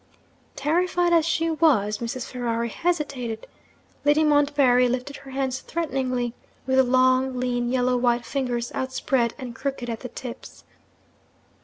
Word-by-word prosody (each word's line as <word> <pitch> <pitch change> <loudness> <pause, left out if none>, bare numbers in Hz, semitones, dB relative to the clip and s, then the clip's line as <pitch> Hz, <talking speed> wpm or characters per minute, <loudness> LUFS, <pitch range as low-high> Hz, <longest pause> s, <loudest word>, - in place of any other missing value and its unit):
Terrified 345 +4 +1
as 330 -1 +4
she 330 0 +1
was, 225 -11 +2
Mrs. 235 +1 -4
Ferrari 235 -2 -2
hesitated. 275 -8 -2 0.6
Lady 295 +2 +4
Montbarry 285 -4 +4
lifted 255 +3 -3
her 275 -1 -13
hands 265 -1 -2
threateningly, 255 -8 -2 0.3
with 260 0 +1
the 265 - +7
long, 255 0 +3
lean, 245 -1 -1
yellow 250 0 +2
white 240 -1 +1
fingers 240 -1 -2
outspread 260 -2 0
and 255 -4 -7
crooked 265 -2 -4
at 225 - -4
the 250 - -7
tips. 245 0 -9
255 Hz, 135 wpm, -24 LUFS, 245-285 Hz, 0.6 s, the